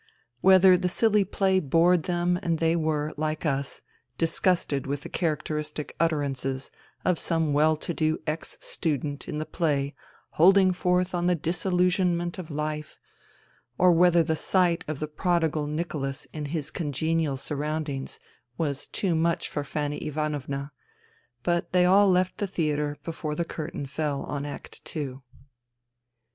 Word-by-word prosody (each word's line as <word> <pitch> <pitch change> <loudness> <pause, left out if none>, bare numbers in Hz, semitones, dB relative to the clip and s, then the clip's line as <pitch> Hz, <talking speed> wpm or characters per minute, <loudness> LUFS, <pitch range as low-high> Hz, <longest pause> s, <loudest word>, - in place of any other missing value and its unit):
Whether 190 +1 +7
the 180 0 0
silly 210 +2 +3
play 190 0 +2
bored 165 +2 +3
them 175 0 +1
and 165 -1 0
they 165 +1 +2
were, 155 -2 -1
like 155 +1 -2
us, 140 -2 -1 0.4
disgusted 165 -4 +1
with 140 +1 -2
the - - -8
characteristic 150 -2 -2
utterances 140 -4 -1 0.3
of 180 -3 +2
some 160 -3 +1
well 155 +2 +4
to 170 - -4
do 155 0 +1
ex 155 +1 -3
student 145 -3 -2
in - - -4
the 155 - -2
play 145 -5 0 0.4
holding 190 +2 +5
forth 180 0 +1
on 175 0 0
the 180 - +3
disillusionment 175 +1 0
of 175 - -7
life, 150 0 -4 0.8
or 180 0 +6
whether 175 0 +5
the 160 0 0
sight 175 +1 +2
of 155 -1 -3
the 155 - -2
prodigal 160 -1 0
Nicholas 150 -3 -3
in 150 -1 -4
his 150 0 -3
congenial 160 -1 -1
sur 145 +2 -5
roundings 150 -2 -3 0.4
was 145 -4 -2
too 190 -4 -1
much 165 +1 +1
for 145 - -3
Fanny 145 0 -3
Ivanovna; 145 -2 -3 0.7
but 175 0 0
they 180 -1 +5
all 195 +2 +6
left 185 0 +1
the 205 - 0
theatre 150 -5 -1
before 160 -2 -4
the 170 - -1
curtain 155 -3 -5
fell 145 0 -2
on 145 0 -4
act 145 - -9
two. 140 -5 -5
160 Hz, 150 wpm, -27 LUFS, 150-175 Hz, 0.8 s, Whether